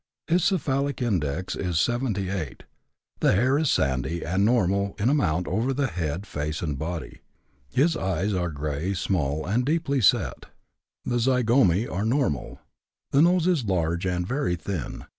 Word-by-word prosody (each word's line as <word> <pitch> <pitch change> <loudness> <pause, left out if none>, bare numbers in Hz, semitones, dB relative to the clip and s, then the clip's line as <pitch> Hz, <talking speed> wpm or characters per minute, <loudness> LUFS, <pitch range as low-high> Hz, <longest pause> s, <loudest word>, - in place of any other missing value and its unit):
His 170 +1 +2
cephalic 140 -7 0
index 90 - -1
is 90 -4 -1
78. 100 - -1 0.6
The - - +3
hair 130 +8 +3
is 155 -3 +1
sandy, 70 +5 0
and 95 +3 +1
normal 100 -3 +2
in 105 +5 +1
amount 90 - +1
over 130 +8 0
head, 90 - -3
face, 75 -3 -4
and 75 -4 -2
body. 80 -6 -5 0.5
His 160 +5 +2
eyes 95 - -1
are 90 -2 0
gray, 75 +5 -3
small, 80 -5 -1
and 110 +7 +1
deeply 145 -1 0
set; 100 - +2 0.6
the 120 - 0
zygomæ 120 -5 +3
are 95 +3 -2
normal. 115 - -1 0.5
The 140 - +4
nose 175 0 +4
is 170 -9 +2
large 85 -2 0
and 90 -1 -1
very 95 -6 -1
thin. 85 -3 -5
100 Hz, 145 wpm, -25 LUFS, 85-130 Hz, 0.6 s, The